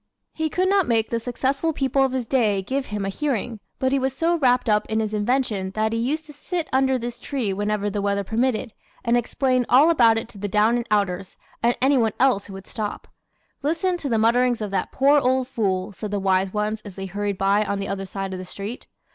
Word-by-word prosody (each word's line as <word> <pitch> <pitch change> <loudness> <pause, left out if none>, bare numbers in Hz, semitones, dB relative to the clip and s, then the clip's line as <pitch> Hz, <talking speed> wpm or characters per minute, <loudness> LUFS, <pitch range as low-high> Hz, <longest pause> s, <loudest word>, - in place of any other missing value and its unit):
He 315 0 -1
could 370 +4 +1
not 390 -1 +3
make 225 -2 +1
the 230 - 0
successful 265 +6 -1
people 270 -1 +1
of 265 - +1
his 255 -2 -2
day 215 -6 +1
give 265 +6 -2
him 205 -1 -3
a - - -1
hearing, 240 -2 -2 0.2
but 260 0 0
he 275 - +2
was 265 0 -2
so 335 +1 +2
wrapped 250 -4 +2
up 210 -1 +2
in 220 0 0
his 215 -1 -2
invention 210 -3 0
that 220 +1 0
he 230 - 0
used 300 +7 -1
to 300 - -12
sit 335 +3 -4
under 265 0 +3
this 240 0 -5
tree 240 -7 -2
whenever 205 +1 -1
the 205 0 -2
weather 200 0 0
permitted, 225 +2 -1 0.3
and 235 +1 +3
explain 255 +1 +1
all 285 +7 +6
about 230 -8 +5
it 225 - -3
to 210 - -13
the 205 - -2
down 210 +4 +3
and 240 -1 -2
outers 195 -3 -1 0.2
and 240 +1 +2
any 270 0 +4
one 225 -3 +1
else 250 -7 +3
who 200 - -10
would 195 0 -9
stop. 210 -2 -5 0.5
"Listen 330 +5 0
to 305 -5 -4
the 230 - +2
mutterings 240 +2 +3
of 210 -2 -4
that 190 -2 -1
poor 280 +2 +4
old 260 -1 +1
fool" 200 -6 -1
said 210 +2 -6
the 205 0 -1
wise 190 0 +1
ones 210 +1 -2
as 205 -4 -10
they 195 - -5
hurried 200 +1 -3
by 200 +2 +3
on 200 -1 -2
the 200 0 -3
other 195 -1 -4
side 195 0 -4
of 185 - -5
the - - -6
street. 200 +6 -7
230 Hz, 240 wpm, -23 LUFS, 205-265 Hz, 0.5 s, all